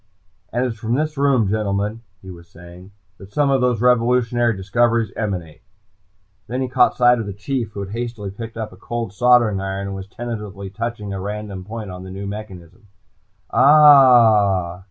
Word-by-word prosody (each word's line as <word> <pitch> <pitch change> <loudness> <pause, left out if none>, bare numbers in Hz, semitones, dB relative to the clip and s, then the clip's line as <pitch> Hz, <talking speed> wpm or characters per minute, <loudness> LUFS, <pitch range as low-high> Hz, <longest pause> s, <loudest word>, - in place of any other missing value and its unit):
"... 90 - -43
and 120 +2 0
it - - -1
is 115 -2 -8
from 115 +1 -1
this 155 +2 -2
room, 135 -6 +2
gentlemen," 105 +1 -2 0.2
he 95 - -9
was 85 -1 -14
saying, 90 +2 -14 0.3
"That 95 0 -13
some 145 +3 +1
of 135 -1 +2
those 125 -3 +1
revolutionary 120 -2 +2
discoveries 115 +2 +1
emanate!" 90 -8 -5 0.9
Then 125 +2 -3
he - - -2
caught - - +2
sight 125 -1 +4
of 110 - -4
the 100 - -5
Chief, 115 +1 -4
who 100 - -6
had 100 -1 -7
hastily 115 -3 -5
picked 115 +3 -9
up 110 -1 -5
a - - -15
cold 115 0 -5
soldering 120 -4 +3
iron 95 0 -4
and 100 0 -5
was 95 0 -8
tentatively 105 -4 -7
touching 105 -1 -5
a 95 - -5
random 100 -1 -6
point 110 -2 -7
on 90 0 -9
the 95 - -10
new 95 +1 -7
mechanism. 100 0 -9 0.6
"Ah 120 - +5
h!" - - -16
110 Hz, 190 wpm, -20 LUFS, 95-120 Hz, 0.9 s, Ah